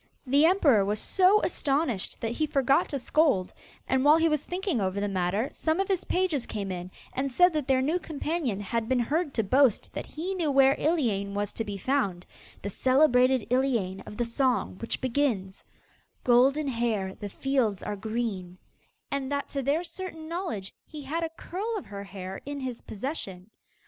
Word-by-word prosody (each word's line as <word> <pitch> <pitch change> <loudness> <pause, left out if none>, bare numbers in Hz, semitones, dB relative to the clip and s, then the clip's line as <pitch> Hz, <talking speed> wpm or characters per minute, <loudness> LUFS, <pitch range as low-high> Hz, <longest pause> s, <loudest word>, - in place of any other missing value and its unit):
The 280 +5 +5
emperor 290 - +4
was 205 +2 -1
so 385 - +3
astonished 275 - 0
that 225 - -1
he 310 +6 -1
forgot 275 +4 +2
to 280 - -2
scold, 270 - +2 0.3
and 260 0 +2
while 300 +2 +7
he 330 0 +3
was 305 -2 0
thinking 360 - -2
over 190 +1 -1
the 205 - 0
matter, 195 +5 -1
some 320 +2 0
of 390 - +1
his 380 -3 0
pages 360 -8 0
came 200 -3 -4
in 180 0 -5 0.2
and 270 +1 -2
said 360 +6 +5
that 300 -4 -2
their 260 -1 +3
new 320 +6 +1
companion 305 - -2
had 225 +3 -2
been 260 - +3
heard 295 +6 0
to 225 - +2
boast 255 +2 +3
that - - -5
he 350 +5 -4
knew 340 -5 0
where 270 -1 +5
Iliane 220 - 0
was 205 0 -2
to 225 - -3
be 205 -2 -5
found 195 -6 -1 0.4
the 200 - -2
celebrated 255 -1 +3
Iliane 235 -8 +1
of 210 - -9
the 240 - 0
song 245 -5 0
which 230 - -3
begins: 240 -8 -1 0.6
'Golden 270 +5 +4
Hair 230 -6 -1
The 205 - -5
fields 245 -4 0
are 210 - -3
green,' 205 -4 -4 0.5
and 280 -1 -2
that 285 0 -2
to 275 - -2
their 285 +6 +1
certain 335 -2 -7
knowledge 335 - -4
he 300 -2 -10
had 320 +5 -2
a 325 - -1
curl 400 +7 -4
of 395 - -7
her 200 -1 -7
hair 190 -1 -7
in 285 0 -5
his 255 -3 -5
possession. 205 - -6
260 Hz, 185 wpm, -28 LUFS, 205-310 Hz, 0.6 s, while